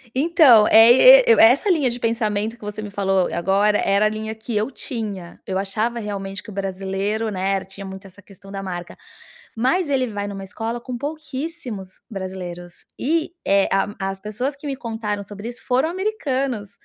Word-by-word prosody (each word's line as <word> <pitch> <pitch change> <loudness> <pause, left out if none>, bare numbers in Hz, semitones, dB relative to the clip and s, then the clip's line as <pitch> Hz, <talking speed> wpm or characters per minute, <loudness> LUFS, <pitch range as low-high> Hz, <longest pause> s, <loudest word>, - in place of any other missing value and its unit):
Então 280 -7 +6
é 225 +1 +8
e - - +9
e 470 - +8
e - - 0
é - - +8
essa 280 +11 0
linha 305 -8 +3
de 240 +1 -5
pensamento 225 -1 -1
que - - -17
você 210 +1 -5
me 210 - -6
falou 195 -2 +1
agora, 200 +4 +2
era 200 +2 +2
a 215 - +4
linha 220 0 -5
que 220 +1 -6
eu 215 +6 0
tinha. 205 -10 -6
Eu 190 - -2
achava 215 +5 -1
realmente 195 -2 -5
que 230 - -13
o - - -9
brasileiro, 195 +3 -2
né, 195 -1 -1
tinha 195 +1 -10
muito 190 0 -9
essa 195 +2 -17
questão 195 +1 -15
da 195 0 -5
marca, 175 -2 -6 0.6
mas 290 +7 +1
ele 260 -2 +1
vai 205 -2 -4
numa 195 -1 -6
escola 225 +4 -5
com 245 0 -6
pouquíssimos 285 - -6
brasileiros, 185 -4 -7
e, 320 +5 0
eh, 195 0 +3
a 195 +1 0
as 195 0 -3
pessoas 230 +7 -3
que 290 - -11
me 275 -1 -3
contaram 220 -4 -4
sobre 205 +2 -8
isso 240 - -10
foram 260 +4 +2
americanos, 275 - -2
215 Hz, 190 wpm, -21 LUFS, 195-250 Hz, 0.6 s, e